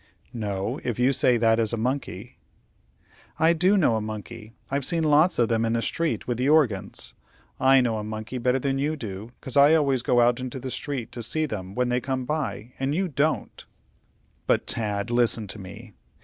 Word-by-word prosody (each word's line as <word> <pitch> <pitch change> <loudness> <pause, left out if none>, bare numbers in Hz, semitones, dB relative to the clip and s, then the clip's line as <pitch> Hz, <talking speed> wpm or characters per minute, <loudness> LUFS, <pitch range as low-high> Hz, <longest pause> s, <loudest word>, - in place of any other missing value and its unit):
"No, 105 +2 -3
if 120 -4 -2
you 125 +3 +3
say 125 -2 +3
that 115 0 +3
is 115 0 +1
a - - 0
monkey." 125 -3 -4 1.0
"I 165 +1 +4
do 185 +5 +3
know 130 - +3
a - - -2
monkey. 110 +1 -7 0.2
I've 140 0 0
seen 165 +4 0
lots 155 +3 +4
of 120 - +3
them 115 0 +1
in 115 0 0
the 115 - +1
street 165 -1 -2
with 120 -1 -2
the 130 +3 +2
organs. 110 -11 +1 0.5
I 135 0 +5
know 115 -3 0
a - - -5
monkey 110 +3 -5
better 125 +2 +2
than 135 0 -1
you 150 +3 0
do, 110 -4 -7
'cause 130 - -5
I 145 +3 +7
always 140 -5 +2
go 120 0 +2
out 120 +1 +3
into 130 0 -5
the 130 0 -5
street 135 -5 -4
to 120 - -6
see 155 +7 -1
them 100 -7 -6
when 125 0 0
they 125 +1 0
come 130 -1 -3
by, 130 -5 -3
and 135 +2 -1
you 185 +1 0
don't." 150 +2 -1 0.8
"But, - - +2
Tad, 105 0 -2
listen 120 -2 +1
to 105 - -5
me. 100 +4 -11
125 Hz, 205 wpm, -25 LUFS, 110-140 Hz, 1.0 s, I